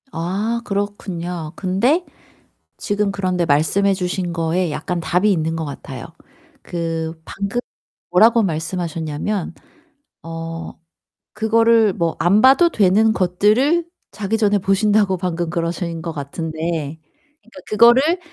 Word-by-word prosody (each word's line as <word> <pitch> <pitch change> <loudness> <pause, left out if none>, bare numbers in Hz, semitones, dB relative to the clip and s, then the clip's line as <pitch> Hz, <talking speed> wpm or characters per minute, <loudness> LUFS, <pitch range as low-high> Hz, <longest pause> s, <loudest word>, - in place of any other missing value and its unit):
아 200 +8 -2
그렇군요. 180 -5 -4
근데 235 - +1 0.7
지금 205 -1 -1
그런데 185 -3 -1
말씀해 165 +7 +2
주신 180 -1 -2
거에 165 +1 0
약간 175 +3 -3
답이 180 +5 +2
있는 165 -3 0
것 165 - -3
같아요. 135 -3 -8 0.6
그 165 -1 -4
방금 200 +4 -3 0.5
뭐라고 225 +5 +5
말씀하셨냐면 165 +1 -3 0.7
어 165 0 -6 0.6
그거를 225 -1 +3
뭐 170 -2 -1
안 180 +6 +4
봐도 275 +7 +6
되는 215 - +3
것들을 215 - +2 0.3
자기 215 +1 -2
전에 205 -2 +2
보신다고 195 0 +2
방금 175 -2 -2
그러신 170 0 -3
것 165 0 -4
같은데 160 +1 -4 0.4
그러니까 230 -5 -15
그거를 245 - +5
185 Hz, 255 characters per minute, -20 LUFS, 165-210 Hz, 0.7 s, 봐도